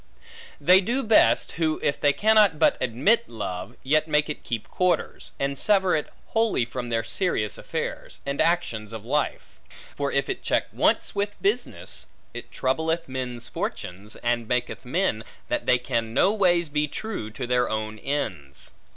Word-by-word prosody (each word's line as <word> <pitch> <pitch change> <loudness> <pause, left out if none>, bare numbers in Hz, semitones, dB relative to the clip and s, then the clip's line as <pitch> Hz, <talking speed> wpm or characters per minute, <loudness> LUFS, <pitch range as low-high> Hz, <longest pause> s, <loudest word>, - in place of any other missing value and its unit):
They 185 +1 +6
do 245 +7 -1
best, 220 -1 +4
who 160 -2 +1
if 140 - 0
they 145 - +5
cannot 210 -1 +4
but 160 - +4
admit 135 - +2
love, 100 -1 -5
yet 155 +3 +2
make 150 0 +2
it - - -7
keep 115 -3 -4
quarters; 180 -1 -1
and 140 0 -1
sever 190 -3 +3
it 150 - -3 0.2
wholly 225 - +2
from 120 0 -5
their 115 -1 0
serious 115 - -1
affairs, - - -5
and 140 0 -1
actions, 115 -11 0
of 110 -1 -7
life; 145 +4 -2 0.4
for - - -1
if - - +1
it - - -3
check - - 0
once - - +2
with 205 0 -2
business, 400 +2 -2 0.3
it - - -7
troubleth 160 +5 -1
men's 125 -2 -4
fortunes, 100 +5 -5
and 120 -1 0
maketh 125 +2 -2
men, 130 - 0 0.3
that - - -1
they 125 - +5
can 115 -3 -2
no 195 - +4
ways 175 -5 +3
be 150 +1 0
true 195 - -5
to 125 +4 -5
their 125 0 +1
own 110 0 -3
ends. 90 - -4
140 Hz, 165 wpm, -25 LUFS, 115-180 Hz, 0.4 s, They